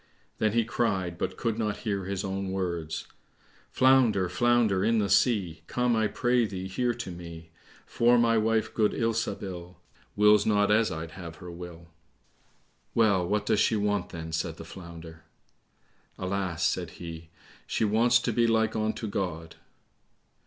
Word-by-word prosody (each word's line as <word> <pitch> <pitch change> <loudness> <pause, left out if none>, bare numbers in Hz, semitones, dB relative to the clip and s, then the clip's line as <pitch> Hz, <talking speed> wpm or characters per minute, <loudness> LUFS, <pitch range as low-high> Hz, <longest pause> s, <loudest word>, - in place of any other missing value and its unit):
Then 110 -1 +1
he 115 -1 +2
cried, 95 -7 -1
but - - -3
could 115 -1 -2
not 105 -2 -1
hear 100 -3 -1
his 95 0 -3
own 95 0 -3
words, 85 -4 -3 0.6
"Flounder, 120 -8 +4
flounder 110 -1 +2
in 115 +2 +2
the 100 -3 0
sea, 100 -6 +2
Come, 125 -1 +1
I 110 -1 +2
pray 120 +1 +1
thee, 95 -1 -5
here 120 +5 -1
to 115 -6 -6
me; 85 -1 -10 0.3
For 120 +1 +3
my 115 -1 +3
wife, 110 0 +1
good 105 -2 +2
Ilsabil, 100 -6 -3 0.4
Wills 105 0 +5
not 105 -1 +2
as 110 +1 +3
I'd 80 0 -5
have 85 -1 -9
her 90 -1 -10
will." 85 -1 -10 1.1
"Well, 100 -6 +3
what 105 +2 0
does - - +2
she 110 - +3
want, 105 -3 0
then?" 80 -1 -7
said 80 +1 -3
the 80 - -9
Flounder. 85 -2 -11 0.9
"Alas," 95 -3 -2
said - - 0
he, 85 -1 -8 0.4
"she 110 - 0
wants 115 +3 +4
to 120 - -1
be 115 +1 +3
like 110 -1 +2
unto 110 +1 -1
God." 80 -5 -4
100 Hz, 155 wpm, -28 LUFS, 85-115 Hz, 1.1 s, Wills